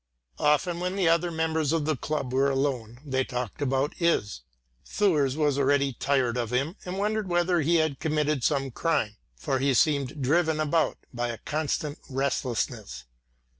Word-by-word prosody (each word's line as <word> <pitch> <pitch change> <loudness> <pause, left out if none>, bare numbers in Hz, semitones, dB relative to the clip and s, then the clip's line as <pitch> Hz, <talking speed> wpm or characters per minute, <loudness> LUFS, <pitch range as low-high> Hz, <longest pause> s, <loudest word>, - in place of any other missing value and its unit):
Often 170 +4 +2
when 180 +1 -2
the 190 -3 +2
other 170 +1 +3
members 160 -2 0
of 160 -2 0
the 155 0 +1
club 135 -1 -3
were 135 +1 +3
alone, 130 -4 -1
they 130 -2 0
talked 125 -1 -5
about 135 +1 0
Is. 105 - +1 0.4
Thurs 150 -10 +1
was 145 -3 +1
already 140 0 +2
tired 125 -2 0
of 120 -2 -1
him 135 - -1
and 180 +1 -4
wondered 210 0 0
whether 175 -1 +2
he 165 +3 +2
had 155 -4 +1
committed 150 -3 0
some 135 -1 +1
crime, 115 -8 0 0.2
for 130 - -1
he 135 0 +2
seemed 140 0 +2
driven 160 +4 +2
about 155 +1 +1 0.2
by 120 0 -1
a 115 -1 -4
constant 150 +1 -2
restlessness. 120 - -2
145 Hz, 165 wpm, -27 LUFS, 130-160 Hz, 0.4 s, other